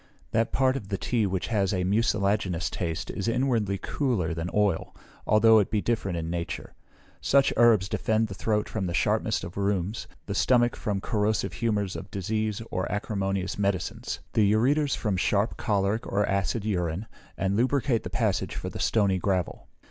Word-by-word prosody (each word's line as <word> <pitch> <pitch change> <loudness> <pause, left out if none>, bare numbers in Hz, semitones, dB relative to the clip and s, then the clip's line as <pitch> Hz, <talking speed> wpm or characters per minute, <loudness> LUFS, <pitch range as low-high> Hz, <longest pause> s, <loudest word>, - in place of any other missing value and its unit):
That 115 +1 +1
part 130 0 +2
of 125 -8 -5
the 100 -1 -2
tea 110 0 0
which 95 -1 -2
has 100 -4 +1
a 90 - 0
mucilaginous 100 -3 +1
taste 80 -3 -3
is 100 - -4
inwardly 115 -5 +1
cooler 105 - -1
than 80 +2 -3
oil, 105 -5 0 0.3
although 110 +1 +6
it 100 - +1
be 110 - +1
different 100 -5 -1
in 80 -1 -3
nature. 85 0 -4 0.5
Such 140 0 +3
herbs 115 -5 +5
defend 110 +2 0
the 100 - -7
throat 105 +3 0
from 100 -4 -3
the 85 - -2
sharpness - - +1
of 85 +3 -7
rheums, 100 +1 -1 0.2
the 100 - -4
stomach 120 +3 +3
from 100 -2 -2
corrosive 105 0 0
humours 105 -4 -1
of 95 - -7
disease 110 +3 -2
or 95 - -2
acrimonious 100 -2 -2
medicines; 100 +4 -2
the 105 -3 +4
ureters 140 +7 +2
from 105 -4 -1
sharp, 100 +4 +1
choleric, 105 0 0
or 100 +1 +2
acid 100 +3 -1
urine, 90 -1 -1 0.3
and 95 +1 0
lubricate 125 0 +1
the - - -6
passage - - -1
for - - -4
the - - -7
stony 100 -4 +2
gravel. 95 -1 -1
105 Hz, 170 wpm, -27 LUFS, 95-115 Hz, 0.5 s, although